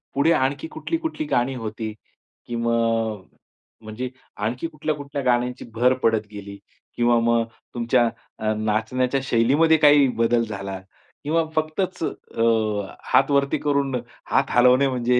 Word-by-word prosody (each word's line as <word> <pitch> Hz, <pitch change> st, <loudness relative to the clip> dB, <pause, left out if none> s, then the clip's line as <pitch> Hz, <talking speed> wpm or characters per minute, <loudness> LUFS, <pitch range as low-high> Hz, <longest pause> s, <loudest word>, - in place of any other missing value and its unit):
पुढे 140 Hz, +4 st, +3 dB
आणखी 135 Hz, +2 st, 0 dB
कुठली-कुठली 320 Hz, -, -3 dB
गाणी 130 Hz, -, +1 dB
होती 110 Hz, -2 st, -5 dB, 0.5 s
की 120 Hz, -, -5 dB
मग 115 Hz, -3 st, 0 dB, 0.6 s
म्हणजे 110 Hz, +4 st, -5 dB, 0.3 s
आणखी 120 Hz, +9 st, -2 dB
कुठल्या-कुठल्या 150 Hz, -2 st, -4 dB
गाण्यांची 125 Hz, 0 st, 0 dB
भर 125 Hz, +3 st, +3 dB
पडत 110 Hz, -1 st, +2 dB
गेली? 100 Hz, -1 st, -9 dB, 0.4 s
किंवा 120 Hz, 0 st, +3 dB
मग 115 Hz, 0 st, +2 dB, 0.3 s
तुमच्या 120 Hz, 0 st, +2 dB, 0.3 s
अ, 110 Hz, 0 st, 0 dB
नाचण्याच्या 110 Hz, +5 st, 0 dB
शैलीमध्ये 140 Hz, +7 st, +3 dB
काही 145 Hz, -2 st, +6 dB
बदल 115 Hz, 0 st, +3 dB
झाला? 100 Hz, -3 st, -5 dB, 0.4 s
किंवा 160 Hz, +3 st, +1 dB
फक्तच 155 Hz, +4 st, -1 dB
अ, 115 Hz, -, -4 dB, 0.7 s
हातवरती 140 Hz, 0 st, +3 dB
करून 140 Hz, -2 st, 0 dB, 0.4 s
हात -, -, +3 dB
हलवणे 125 Hz, +3 st, +5 dB
म्हणजे 125 Hz, -1 st, +1 dB
125 Hz, 120 wpm, -23 LUFS, 115-140 Hz, 0.7 s, काही